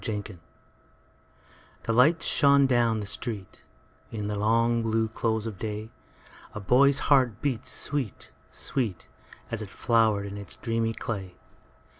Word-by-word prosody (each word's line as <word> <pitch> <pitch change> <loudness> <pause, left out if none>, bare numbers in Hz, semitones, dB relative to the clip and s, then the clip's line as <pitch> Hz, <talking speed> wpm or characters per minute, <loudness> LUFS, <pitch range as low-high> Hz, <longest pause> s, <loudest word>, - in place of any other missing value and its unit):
Awakening 105 -4 -5 1.4
THE 115 - -1
LIGHTS 150 +8 +4
shone 140 -1 +5
down 120 -4 +2
the - - -5
streetIn 105 -1 -5 0.5
the 105 -2 -4
long 115 +3 +2
blue 110 0 0
close 110 0 -1
of 110 -4 -6
day:A 110 0 -9
boy's 130 +7 +4 0.2
heart 125 -6 +3
beat 130 -6 -2
sweet, 140 -8 -3 0.2
sweet, 115 -9 -3 0.4
As 115 -2 -2
it 105 - -7
flowered 110 -3 +2
in 100 0 -6
its 100 -1 -6
dreamy 115 -1 -1
clay. 95 -6 -5
115 Hz, 125 wpm, -27 LUFS, 105-120 Hz, 1.4 s, shone